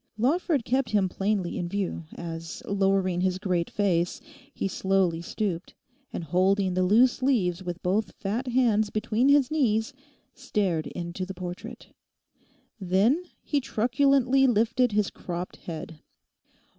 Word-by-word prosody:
Lawford 285 - +1
kept 255 -1 +1
him 205 -3 +2
plainly 195 -1 -1
in 175 - -3
view, 195 -4 -3
as, 165 -1 -7
lowering 195 -2 +1
his 185 0 +1
great 180 -3 -1
face, 175 -4 0 0.3
he 200 - -2
slowly 190 -3 +1
stooped, 180 -1 -3 0.4
and - - -4
holding 185 +3 +2
the 185 - +1
loose 230 +8 +4
leaves 195 -10 +1
with 175 -1 -6
both 190 +1 0
fat 225 +6 -3
hands 235 -4 +2
between 225 +4 +1
his 280 -2 +4
knees, 225 -8 +1 0.4
stared 180 -8 -1
into 175 +1 -5
the 190 +1 -6
portrait. 185 +6 -8 0.9
Then 205 - +2 0.2
he 290 -2 0
truculently 265 +2 +3
lifted 235 +1 +2
his 210 -1 +1
cropped 175 0 -6
head. 160 -1 -8
200 Hz, 130 wpm, -27 LUFS, 180-240 Hz, 0.9 s, loose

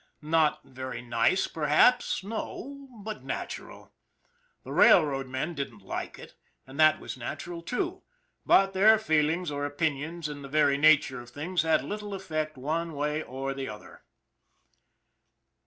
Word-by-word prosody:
Not 155 -1 +2
very 130 -2 -7
nice 120 +10 +2
perhaps, 160 - +3
no 275 +6 -6 0.2
but 215 0 -6
natural. - - -7 0.7
The - - -9
railroad 140 -5 +5
men 130 +6 -3
didn't 130 -9 -6
like - - -5
it, - - -12 0.3
and 135 +3 -11
that 155 0 +6
was - - -7
nat 120 -1 -6
ural, 175 -1 -7
too; 350 - -3 0.4
but 195 0 +4
their 215 +4 +6
feelings 160 -3 +1
or 145 0 -3
opinions, 150 +2 -2
in 145 -1 -7
the 140 - -9
very 140 -1 +3
nature 145 -4 +4
of 120 - -13
things, 160 +8 -2
had 160 -4 +2
little 205 +5 -5
effect 155 -5 -4
one 160 +5 -2
way 150 +2 -1
or 135 -1 -4
the 135 -2 -5
other. 105 0 -11
155 Hz, 145 wpm, -28 LUFS, 135-175 Hz, 0.7 s, that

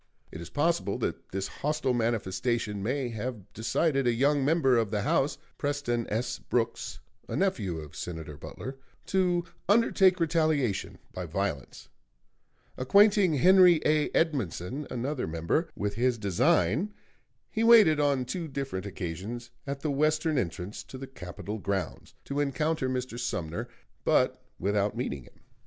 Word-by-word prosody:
It 80 - -8
is 85 - -8
possible 155 -8 0
that - - -4
this 95 0 -3
hostile 150 0 -1
manifestation 115 -2 -1
may 125 +4 -1
have 110 -3 -6
decided 135 +4 +1
a - - +5
young 140 +4 +2
member 140 -3 +3
of 115 -3 +2
the 105 -1 -1
House, 140 +6 +1 0.2
Preston 140 -5 -1
S. 115 +4 -2
Brooks, 115 -1 -2 0.3
a - - -4
nephew 110 - 0
of 75 -1 -9
Senator 80 -2 -6
Butler, 130 - -8 0.3
to 180 -2 +1 0.2
undertake 195 -4 +4
retaliation 155 - +1 0.2
by 90 -1 -5
violence. 80 -5 -3 0.9
Acquainting 200 +4 +5
Henry 180 +4 +7
A. 150 0 +3
Edmundson, 135 - -1
another 125 - -2
member, 85 - 0
with 100 0 -2
his 120 +2 +1
design, 100 - +2 0.6
he 225 - 0
waited 215 -10 +7
on 140 -3 +2
two 165 +6 -4
different 135 -9 -4
occasions 100 +7 -5 0.2
at 140 0 -4
the 150 - -1
western 155 +2 +1
entrance 90 0 -4
to 130 - -9
the 135 - -6
Capitol 105 -3 -7
grounds 100 -1 -3
to 140 +1 -2
encounter 145 0 0
Mr. 125 -2 -3
Sumner, 85 -9 -3 0.4
but - - +2 0.2
without 100 +3 0
meeting 75 - -3
him. - - -21
125 Hz, 140 wpm, -29 LUFS, 100-150 Hz, 0.9 s, Henry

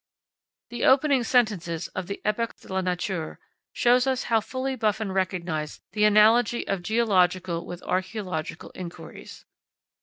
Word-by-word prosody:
The 240 -1 -4
opening 270 -1 +4
sentences 210 -10 +1
of 185 -1 -5
the 200 - -6
"Epoques 225 +2 -1
de - - -9
la 190 - +1
Nature" 180 -2 -3 0.3
show 245 +1 +4
us 255 0 0
how 225 -1 +2
fully 260 +4 -3
Buffon 215 -3 -1
recognised 180 -5 -2
the 210 -1 +2
analogy 215 +3 +4
of 195 -2 -1
geological 185 -5 +1
with 175 0 -8
archaeological 185 -4 -3
inquiries. 175 -2 -10
205 Hz, 130 wpm, -26 LUFS, 180-235 Hz, 0.3 s, opening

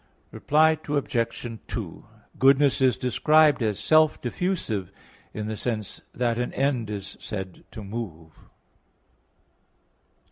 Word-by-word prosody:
Reply 155 +1 +3
Obj. 120 -5 -2
2: - - -6 0.3
Goodness 135 +1 +4
is 130 -1 +4
described 150 +3 +3
as 105 -3 0
self 155 -1 +3
diffusive 120 - -2 0.4
in 105 - -5
the 110 0 -3
sense 110 -2 -4
that 120 -1 -1
an 125 - -2
end 130 -5 0
is 100 -2 -6
said 95 -3 -6
to 110 - -9
move. 95 -7 -7
120 Hz, 110 wpm, -25 LUFS, 105-145 Hz, 0.4 s, Goodness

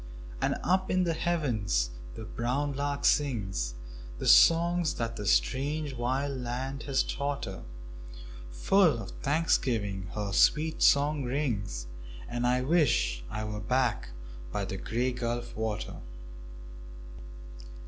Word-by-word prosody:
And - - +1
up 185 +1 +1
in 185 0 +2
the 170 -2 +1
heavens 110 - 0 0.2
the - - -7
brown 135 +5 -2
lark 140 +1 -2
sings 95 - +1 0.4
The - - -5
songs 170 -2 +5
that 115 0 -3
the 105 -2 -5
strange 145 +5 +1
wild 130 +3 -2
land 130 +3 -4
has 135 -1 +2
taught 140 0 -3
her; 95 -2 -7 0.9
Full 155 - +3
of 95 - -9
thanksgiving 115 -10 0
her 105 -2 -2
sweet 155 +8 +3
song 145 0 +4
rings 115 - -2 0.4
And 120 0 -1
I 125 +1 +2
wish - - +2
I 105 +7 -4
were 105 0 -4
back 120 - 0 0.4
by - - -2
the - - -5
Grey 125 +3 -1
Gulf 120 -1 -4
water. 110 -1 -3
125 Hz, 125 wpm, -29 LUFS, 105-145 Hz, 0.9 s, songs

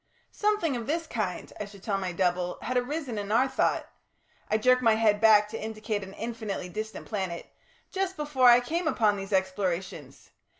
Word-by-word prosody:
"Something 420 -9 0
of 235 -2 -5
this 330 +2 -1
kind," 210 - -4
I 210 - -3
should 200 -1 -14
tell 200 -3 -1
my 185 -2 -3
double, 180 0 0
"had 255 - -2
arisen 250 -2 -2
in 205 0 -5
our 250 +4 +4
thought" 265 - 0 0.6
I 215 - +3
jerk 255 +3 +4
my 225 -3 +4
head 215 -1 +2
back 210 -2 +6
to 225 - -6
indicate 215 -1 -3
an 190 0 -9
infinitely 220 -5 -4
distant 215 +4 -6
planet 190 -5 -4 0.5
"just 380 -1 -2
before 290 -4 +4
I 240 +1 +7
came 330 +7 -2
upon 215 -9 +2
these 195 0 -7
explorations. 185 -6 -2
220 Hz, 180 wpm, -28 LUFS, 195-250 Hz, 0.6 s, I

